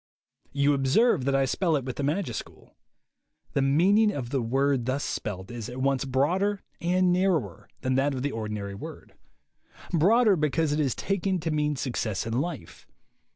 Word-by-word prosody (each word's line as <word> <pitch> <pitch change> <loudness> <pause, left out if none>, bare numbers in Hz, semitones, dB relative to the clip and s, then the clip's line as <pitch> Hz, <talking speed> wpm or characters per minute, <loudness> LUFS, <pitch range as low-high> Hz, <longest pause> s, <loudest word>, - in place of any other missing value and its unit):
You 140 +1 +2
observe 135 - +3
that 135 0 +1
I 135 0 +3
spell 165 +4 +1
it 135 -3 -2
with 130 - -5
the 145 - -2
majuscule. 150 - -4 0.8
The 140 - +1
meaning 190 +11 +4
of 130 -9 -5
the 135 - 0
word 135 +1 +1
thus 135 +3 -1
spelt 95 0 -4
is 120 -3 -6
at 125 - -8
once 135 0 +1
broader 180 +10 0 0.2
and 180 +1 +2
narrower 175 - 0
than 130 - 0
that 135 +2 +1
of 130 - -4
the 145 - -1
ordinary 105 -3 -4
word. 100 - -9 0.8
Broader, 205 +6 +4
because 155 0 0
it 150 - 0
is 140 -4 +1
taken 195 -1 -1
to 160 - -2
mean 150 -1 0
success 120 -6 -2
in 115 - -3
life. 135 - -4
140 Hz, 170 wpm, -27 LUFS, 130-175 Hz, 0.8 s, meaning